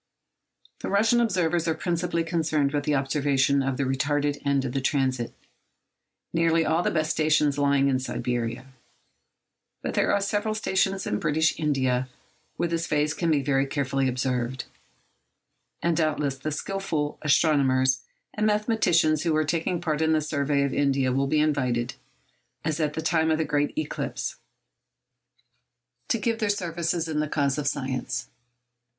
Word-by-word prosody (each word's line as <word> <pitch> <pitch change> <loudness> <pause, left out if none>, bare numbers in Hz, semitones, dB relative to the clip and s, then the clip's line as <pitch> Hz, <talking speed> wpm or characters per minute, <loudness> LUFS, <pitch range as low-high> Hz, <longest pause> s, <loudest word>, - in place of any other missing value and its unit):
The - - -4
Russian 225 +4 +3
observers 175 -6 +1
are 160 - +1
principally 170 -1 -1
concerned 155 -4 0
with 145 -1 -1
the 150 - +2
observation 140 0 +2
of 135 -1 -1
the 140 - 0
retarded 145 +2 0
end 140 -1 +1
of 125 - -2
the 135 +1 -1
transit, 130 -3 0 1.0
nearly 165 0 +2
all 160 +2 +2
the - - +1
best 155 -1 0
stations 150 -2 +2
lying 140 -1 +3
in 130 -2 +2
Siberia. 120 -1 -3 1.2
But - - -2
there - - +2
are - - +3
several 205 +2 -1
stations 195 -2 0
in 105 - -1
British 155 +1 +2
India 130 -4 0 0.5
where 175 - 0
this 165 0 -2
phase 150 0 +1
can 170 0 -1
be 145 -3 +2
very 135 0 +1
usefully 135 -1 0
observed; 125 -1 -2 1.2
and 170 -1 +2
doubtless 150 -4 0
the 155 +3 -3
skilful 155 -3 -3
astronomers 135 -4 +3 0.3
and 215 0 +1
mathematicians 210 -8 +2
who 165 -2 +1
are 155 0 +2
taking 165 +3 -1
part 160 -3 -1
in 160 0 +3
the 155 - +2
survey 140 -1 0
of 140 - -1
India 135 -2 +1
will 135 +1 +1
be 155 +2 +2
invited—as 130 0 -3
at 150 -1 0
the 160 - -3
time 160 0 +2
of 160 - +2
the 160 - 0
great 145 - -1
eclipse—to 310 - -3 1.8
give 225 +1 -1
their 215 -2 0
services 170 -3 -1
in 155 -1 -1
the 150 -1 -1
cause 140 -1 0
of 145 - -2
science. 130 -3 -3
150 Hz, 155 wpm, -26 LUFS, 135-165 Hz, 1.8 s, Russian